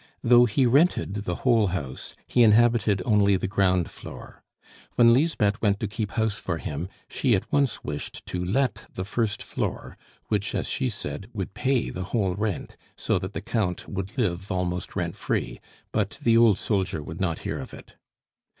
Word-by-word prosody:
Though 120 Hz, +1 st, +7 dB
he 120 Hz, +4 st, +2 dB
rented 140 Hz, -, +3 dB
the 100 Hz, -4 st, -3 dB
whole 115 Hz, -5 st, +4 dB
house, 75 Hz, -8 st, -5 dB
he 125 Hz, -, +2 dB
inhabited 110 Hz, -3 st, +4 dB
only 100 Hz, -2 st, +4 dB
the 95 Hz, -, -1 dB
ground 95 Hz, -3 st, +1 dB
floor. -, -, -11 dB, 0.5 s
When 115 Hz, -1 st, +6 dB
Lisbeth 120 Hz, -7 st, +2 dB
went 100 Hz, -2 st, +2 dB
to 110 Hz, -, -2 dB
keep 105 Hz, -1 st, -4 dB
house 110 Hz, -2 st, 0 dB
for 85 Hz, -2 st, -2 dB
him, 80 Hz, +1 st, -5 dB, 0.2 s
she 125 Hz, -5 st, +2 dB
at 95 Hz, -, -4 dB
once 140 Hz, -3 st, +1 dB
wished 75 Hz, 0 st, -5 dB
to 90 Hz, 0 st, -3 dB
let 125 Hz, +9 st, 0 dB
the 95 Hz, -, -4 dB
first 105 Hz, 0 st, -1 dB
floor, -, -, -4 dB, 0.3 s
which, 105 Hz, -2 st, -1 dB
as -, -, -1 dB
she 130 Hz, -2 st, 0 dB
said, 95 Hz, -3 st, -6 dB
would 95 Hz, -3 st, -4 dB
pay 125 Hz, +4 st, 0 dB
the 90 Hz, 0 st, -5 dB
whole 100 Hz, -2 st, 0 dB
rent, 105 Hz, -1 st, -3 dB, 0.2 s
so -, -, 0 dB
that 95 Hz, +2 st, -6 dB
the -, -, -4 dB
Count 105 Hz, -6 st, -2 dB
would 95 Hz, +4 st, -5 dB
live 95 Hz, -4 st, -1 dB
almost 90 Hz, -2 st, -2 dB
rent -, -, -3 dB
free; -, -, -2 dB, 0.3 s
but -, -, -1 dB
the 115 Hz, -1 st, +4 dB
old 115 Hz, -4 st, +6 dB
soldier 95 Hz, -8 st, -1 dB
would 80 Hz, +4 st, -7 dB
not 85 Hz, -4 st, 0 dB
hear -, -, -2 dB
of -, -, -8 dB
it. -, -, -13 dB
100 Hz, 180 wpm, -26 LUFS, 90-115 Hz, 0.5 s, Though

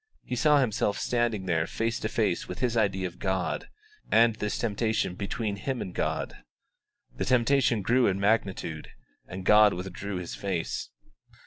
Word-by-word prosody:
He 125 Hz, -, -4 dB
saw 150 Hz, +4 st, +4 dB
himself 110 Hz, -5 st, 0 dB
standing 120 Hz, -5 st, 0 dB
there 80 Hz, -3 st, +1 dB
face 115 Hz, +1 st, -2 dB
to -, -, -2 dB
face -, -, 0 dB
with -, -, -6 dB
his 125 Hz, -2 st, 0 dB
idea 100 Hz, -4 st, +1 dB
of 90 Hz, -1 st, -6 dB
God, 95 Hz, -2 st, -2 dB, 0.4 s
and 115 Hz, -1 st, +5 dB
this 105 Hz, -1 st, -2 dB
temptation 110 Hz, -3 st, 0 dB
between 100 Hz, +2 st, -3 dB
him 130 Hz, +5 st, -3 dB
and 90 Hz, -, -5 dB
God. -, -, -2 dB, 0.8 s
The -, -, -1 dB
temptation 125 Hz, -3 st, +3 dB
grew 125 Hz, +4 st, +3 dB
in 95 Hz, 0 st, 0 dB
magnitude, 95 Hz, -6 st, 0 dB, 0.4 s
and 95 Hz, 0 st, -7 dB
God 105 Hz, -1 st, +6 dB
withdrew 95 Hz, +2 st, -5 dB
His 90 Hz, -1 st, -5 dB
face. 95 Hz, -4 st, -3 dB
105 Hz, 155 wpm, -28 LUFS, 95-115 Hz, 0.8 s, God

